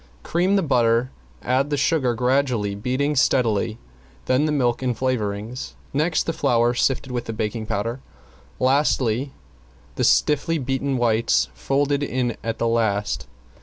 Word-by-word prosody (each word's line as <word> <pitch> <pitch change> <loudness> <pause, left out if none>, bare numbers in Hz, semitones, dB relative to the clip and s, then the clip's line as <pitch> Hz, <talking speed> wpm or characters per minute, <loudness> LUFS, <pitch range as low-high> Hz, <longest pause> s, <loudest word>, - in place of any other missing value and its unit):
Cream 180 +4 +1
the 195 - +2
butter, 120 -3 +2 0.3
add 130 +3 +1
the 145 - 0
sugar 135 -5 +1
gradually, 125 -4 +1
beating 130 +8 -1
steadily, 115 -4 +2 0.5
then 130 +4 +2
the 155 - 0
milk 125 -5 +1
and 125 -3 -1
flavoring, 110 -3 -2 0.4
next 155 +4 +1
the 165 - -2
flour 120 -5 +2
sifted 130 +1 0
with 120 -1 -3
the 115 - -4
baking 110 0 -3
powder, 115 +6 -2
and - - -25 0.6
lastly 135 -2 +1 0.7
the - - 0
stiffly 150 +3 +2
beaten 135 0 -1
whites 115 - +2
folded 140 - 0
in 125 -4 -1
at 115 0 -3
the 115 - 0
last. 110 -3 0
125 Hz, 145 wpm, -23 LUFS, 115-140 Hz, 0.7 s, the